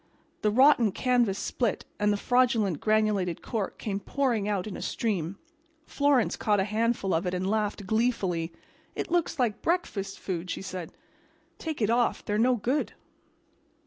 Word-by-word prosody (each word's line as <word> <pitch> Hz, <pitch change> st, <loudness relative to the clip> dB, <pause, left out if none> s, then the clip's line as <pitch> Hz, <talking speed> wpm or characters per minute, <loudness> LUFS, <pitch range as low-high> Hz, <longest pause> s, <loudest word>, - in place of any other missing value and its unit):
The 210 Hz, -, +3 dB
rotten 245 Hz, -1 st, +5 dB
canvas 240 Hz, -6 st, +2 dB
split 235 Hz, -1 st, -1 dB
and 210 Hz, 0 st, +3 dB
the 205 Hz, -, +1 dB
fraudulent 235 Hz, -, +2 dB
granulated 215 Hz, -5 st, +1 dB
cork 215 Hz, -4 st, -3 dB
came 200 Hz, -2 st, -3 dB
pouring 235 Hz, -2 st, 0 dB
out 200 Hz, -3 st, -1 dB
in 210 Hz, -, -6 dB
a -, -, -7 dB
stream. 195 Hz, -5 st, -2 dB, 0.5 s
Florence 285 Hz, -4 st, +2 dB
caught 210 Hz, -2 st, +1 dB
a -, -, +3 dB
handful 215 Hz, -1 st, 0 dB
of 165 Hz, +3 st, 0 dB
it 180 Hz, -, -1 dB
and 185 Hz, +1 st, -2 dB
laughed 210 Hz, -1 st, -1 dB
gleefully. 190 Hz, -6 st, 0 dB, 0.4 s
"It -, -, -4 dB
looks 345 Hz, -1 st, +1 dB
like 235 Hz, -6 st, 0 dB
breakfast 210 Hz, -, -1 dB
food," 180 Hz, -1 st, -4 dB
she -, -, -4 dB
said. 185 Hz, -2 st, -6 dB, 0.7 s
"Take 315 Hz, -7 st, -3 dB
it 210 Hz, -, +2 dB
off. 240 Hz, 0 st, +1 dB
They're 210 Hz, 0 st, 0 dB
no 250 Hz, +2 st, +4 dB
good." 250 Hz, +6 st, -1 dB
215 Hz, 160 wpm, -28 LUFS, 195-245 Hz, 0.7 s, rotten